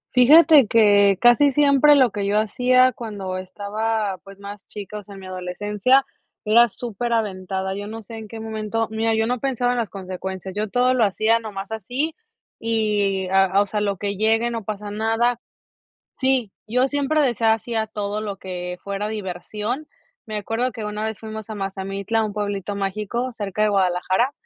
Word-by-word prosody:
Fíjate 290 +1 +7
que 200 -3 +5
casi 245 +4 +5
siempre 290 +1 +5
lo 260 -5 +4
que 200 0 -3
yo 205 +1 +1
hacía 255 +4 +3
cuando 205 -6 -6
estaba, 205 +1 -3
pues, 195 0 -13
más 200 0 -10
chica, 210 0 -7
o - - -12
sea, 200 0 -12
en 195 - -11
mi - - -10
adolescencia, 205 +8 +1 0.4
era 230 +3 +6
superaventada. 200 -5 -3
Yo 205 +1 -6
no 225 +1 -7
sé 225 +2 -9
en 220 -1 -8
qué 225 +2 -8
momento, 220 0 -2
mira, 225 0 +1
yo 220 0 +1
no 250 +2 -1
pensaba 250 -1 0
en 245 - -1
las 230 - -2
consecuencias, 190 0 -6
yo 210 0 -2
todo 250 +3 +2
lo 250 -3 +2
hacía 220 +3 +2
nomás 205 -2 -7
así 250 - -2 0.5
y, 210 -4 0
a 190 0 +4
a 195 +1 +2
o - - -7
sea, 210 +1 -2
lo 200 -2 -1
que 200 +1 -3
llegue, 225 +3 +2
no 230 -2 -4
pasa 210 0 -5
nada 225 +3 +1 0.8
Sí, 260 -6 +1
yo 250 +4 +2
siempre 290 +2 +1
decía 230 -4 +2
sí 235 +2 -7
a 220 -1 0
todo 210 -1 -3
lo 205 -2 -4
que 180 -1 -6
fuera 200 +1 -3
diversión. 210 - -4 0.4
Me 215 -1 -5
acuerdo 225 +5 -1
que 220 -1 -7
una 210 0 -4
vez 220 -1 -3
fuimos 220 -1 -8
a 220 - -5
Mazamitla, 195 +2 -2
un 210 -2 -4
pueblito 205 -1 -3
mágico, 210 +5 -2
cerca 210 -2 -3
de 215 - +3
Guadalajara, 190 +5 +1
215 Hz, 185 wpm, -22 LUFS, 200-235 Hz, 0.8 s, Fíjate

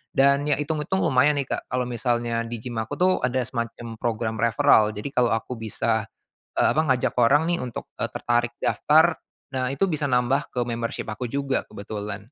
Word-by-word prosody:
dan 140 +1 +4
ya 145 - +3
itung-itung 155 +5 -1
lumayan 140 +3 +4
nih 140 - 0
Kak, - - -3
kalau 125 0 -1
misalnya 120 -1 -1
di 120 - -4
gym 120 -3 -4
aku 110 0 -3
tuh 185 +1 +3
ada 130 0 0
semacam 115 -1 -5
program 110 -1 -2
referral. 110 -1 +4
Jadi 105 +7 -5
kalau 120 -3 +2
aku 115 +1 -5
bisa, 110 0 -1 0.5
eee, - - +4
apa, 155 - +3
ngajak 125 -1 +1
orang 145 +7 +4
nih - - -1
untuk, 125 -2 -6 0.2
eee, - - -1
tertarik 120 0 0
daftar, 160 +3 +4 0.4
nah 130 0 0
itu 165 +9 +1
bisa 150 -5 -1
nambah 125 +3 +1
ke 120 -1 -2
membership 115 -1 -3
aku 120 +2 -5
juga 140 -1 -1
kebetulan. 105 0 -6
125 Hz, 185 wpm, -24 LUFS, 115-140 Hz, 0.5 s, dan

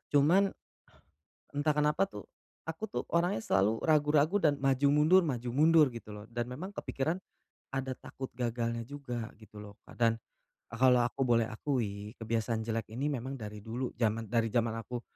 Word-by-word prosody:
Cuma, 175 +8 +5 1.0
entah 145 +1 +1
kenapa 150 +5 +3
tuh, 105 - -9 0.4
aku 160 +6 -6
tuh - - -2
orangnya 170 - +1
selalu 105 +4 +2
ragu-ragu 150 +3 +3
dan 150 -6 +2
maju 135 0 +3
mundur 160 +6 +6
maju 125 -5 -2
mundur 155 +1 +6
gitu 115 -2 -9
loh, 105 - -9
dan 120 0 -2
memang 175 +10 -6
kepikiran 160 +6 -2 0.6
ada 130 0 -2
takut 130 -1 -8
gagalnya 115 -1 -2
juga 125 -6 -5
gitu 105 -1 -12
loh, 105 0 -11
Kak. - - -14
Dan 115 -1 +4 0.6
a - - -3
kalau 125 -2 +6
aku 120 - -4
boleh 115 -2 +3
akui, 110 -4 -3
kebiasaan 115 0 -1
jelek 115 -1 -2
ini 140 +5 -1
memang 135 0 -3
dari 105 -1 -7
dulu 120 +3 -3
zaman 115 -1 0
dari 115 -1 +1
zaman 115 -1 +2
aku 120 +1 -5
125 Hz, 165 wpm, -31 LUFS, 115-150 Hz, 1.0 s, mundur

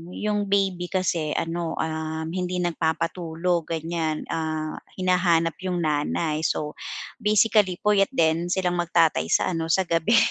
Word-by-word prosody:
yung 210 -1 -1
baby 195 -3 +1
kasi 170 -5 -1
ano, 165 0 -2
um, 160 0 -3
hindi 180 0 -2
nagpapatulog 170 0 -1
ganiyan. 160 -1 -2
Ah, 155 -1 -3 0.2
hinahanap 175 -3 +2
yung 175 -2 -1
nanay. 155 +1 0
So, 150 0 -3 0.4
basically 210 -3 +3
puyat 205 -2 +4
din 165 +1 +2
silang 180 -1 0
mag-tatay 165 - +2
sa 85 - +2
ano 165 -2 -2
sa 190 +4 +3
gabi. 170 +5 +2
170 Hz, 130 wpm, -25 LUFS, 160-185 Hz, 0.4 s, puyat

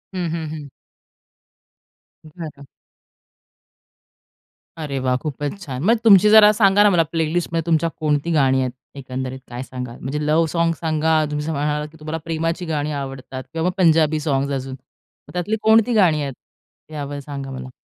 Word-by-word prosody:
हं, 180 -2 -2
हं, 165 -1 -3
हं. 145 -2 -8 1.6
बरं. 155 -3 -9 2.1
अरे 150 -4 -4
वाह! 130 -1 +1
खूपच 145 +5 -5
छान! 135 -4 -5
मग 230 +6 +4
तुमची 210 -2 +7
जरा 210 -1 +8
सांगा 205 -1 +4
ना 210 - +6
मला, 175 -4 +3
प्लेलिस्टमध्ये 165 +1 -1
तुमच्या 165 0 +2
कोणती 150 +1 0
गाणी 135 -4 +3
आहेत? 130 - -1 0.3
एकंदरीत 130 0 -5
काय 120 +1 -6
सांगाल? 125 -2 -7
म्हणजे, 135 +4 -3
लव्ह 155 +2 +3
सॉन्ग्स 170 -2 0
सांगा. 160 -1 +1
तुम्ही 150 - -2
जसं 160 - -3
म्हणालात, 150 +1 -1
की 160 - -17
तुम्हाला 155 +1 -4
प्रेमाची 165 +2 -2
गाणी 150 -2 -2
आवडतात 130 -1 -7
किंवा 165 +2 0
पंजाबी 160 -3 +3
सॉन्ग्स 140 -2 -1
अजून. 135 -1 -4
मग 130 - -23
त्यातली 180 +5 -1
कोणती 225 +2 +4
गाणी 175 -8 +3
आहेत? 140 -2 -3 0.6
यावर 145 -1 -5
सांगा 140 -1 -7
मला. 130 -1 -7
155 Hz, 155 wpm, -21 LUFS, 140-170 Hz, 2.1 s, जरा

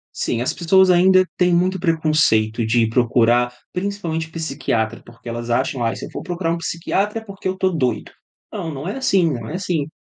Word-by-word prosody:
Sim, 115 - -1
as 125 - -1
pessoas 190 +2 +4
ainda 185 +1 +5
têm 180 -1 +3
muito 185 +2 +1
preconceito 155 - +2
de 115 +2 +2
ir 110 - 0
procurar, 120 0 +2 0.2
principalmente 180 -4 -3
psiquiatra, 135 -8 -2
porque 120 0 -11
elas 120 0 -5
acham 125 +1 0
"Ai, 115 - 0
se - - -7
eu - - -11
for - - -6
procurar 175 -2 -2
um - - -2
psiquiatra 195 +6 -2
é - - -14
porque 195 -2 -6
eu 185 0 -2
tô 190 0 +2
doido". 145 -9 -1 0.4
Não, 160 -2 -5
não 140 +4 -6
é 205 - -3
assim, 195 -11 +2
não 120 -5 -5
é 155 - -5
assim. 175 -6 -2
165 Hz, 205 wpm, -20 LUFS, 120-185 Hz, 0.4 s, ainda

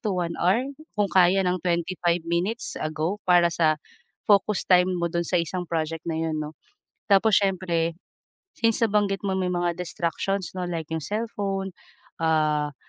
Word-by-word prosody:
to 215 - -2
1 170 -1 -1
hour 195 +8 +3 0.3
kung 205 -1 +2
kaya 185 +1 +5
ng 180 -1 0
25 175 0 0
minutes 175 +7 -1
ago 155 +6 -2
para 175 -1 +5
sa, 155 -2 +2 0.5
focus 205 0 +3
time 180 0 +5
mo 170 - -1
do'n 170 0 -1
sa 170 +1 0
isang 175 +1 -2
project 165 -1 -2
na 160 - -1
'yon 160 -1 -1
'no. 150 0 -6 0.6
Tapos 200 +2 +5
siyempre, 180 -4 +1 0.7
since 230 0 +2
nabanggit 205 -3 +1
mo 190 -1 -1
may 185 - 0
mga 175 -1 0
distractions 180 +2 -2
'no, 185 -1 -4
like 165 -3 -4
'yong 160 - -1
cellphone, 200 -1 -3 0.5
ah, 155 -2 +1
175 Hz, 160 wpm, -25 LUFS, 165-195 Hz, 0.7 s, kaya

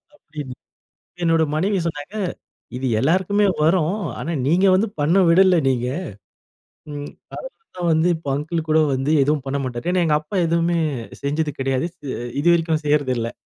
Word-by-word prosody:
அப்படின்னு 150 - -8 0.7
என்னோட 165 -1 +3
மனைவி 195 +6 +1
சொன்னாங்க. 160 +2 -5 0.6
இது 130 +1 -3
எல்லாருக்குமே 190 - +2 0.2
வரும். 165 +3 +2 0.2
ஆனா, 165 - -3
நீங்க 175 +7 +3
வந்து 205 +4 +2
பண்ண 155 +5 +2
விடல 185 +2 +5
நீங்க. 125 -2 0 1.0
ம், 145 0 -6 0.5
அது 455 - -44
தான் 175 -1 0
வந்து 160 +2 +2
இப்போ 160 -3 -6
அங்கிள் 160 +3 -3
கூட 155 +1 +4
வந்து 135 +3 0
எதுவும் 145 0 0
பண்ணமாட்டார். 135 +2 -3
ஏன்னா, 180 -1 +2
எங்க 150 -2 +3
அப்பா 155 +6 -8
எதுவுமே 170 +1 +1 0.5
செஞ்சது 150 +1 -1
கெடையாது. 135 +2 0
செ 140 -5 -6 0.3
இது 165 - 0
வரைக்கும் 165 -2 0
செய்யறதில்ல. 130 -6 +1
155 Hz, 145 wpm, -21 LUFS, 140-170 Hz, 1.0 s, விடல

